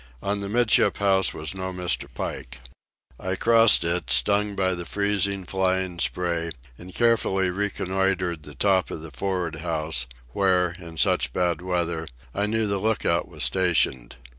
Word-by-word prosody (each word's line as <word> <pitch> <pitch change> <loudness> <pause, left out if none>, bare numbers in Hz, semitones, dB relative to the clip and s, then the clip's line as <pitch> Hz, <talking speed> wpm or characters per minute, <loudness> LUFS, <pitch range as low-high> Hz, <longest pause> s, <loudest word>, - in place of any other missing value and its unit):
On 100 +1 -1
the 100 0 -5
'midship 120 +1 +3
house 95 -1 +3
was 80 +3 -5
no 95 -1 -5
Mr. 90 -6 -2
Pike. - - -6 0.6
I 95 +1 -3
crossed 115 -2 +6
it, 85 -5 -2
stung 100 +11 +3
by 95 -1 0
the 85 -1 -5
freezing, 100 0 0
flying 95 -1 -1
spray, 85 -2 -1 0.3
and 90 +7 -12
carefully 95 -5 +1
reconnoitred 95 -3 -1
the 75 -1 -12
top 95 +4 +2
of 80 - -7
the 80 - -8
for'ard 90 +2 -3
house, 80 -4 -1 0.2
where, 90 +3 +1
in 85 -2 -11
such 60 - +2
bad 85 -2 0
weather, 85 -3 -2 0.3
I 100 +1 -1
knew 110 +1 0
the 100 -1 -1
lookout 105 -5 0
was - - -4
stationed. 85 -9 +1
95 Hz, 155 wpm, -24 LUFS, 85-100 Hz, 0.6 s, crossed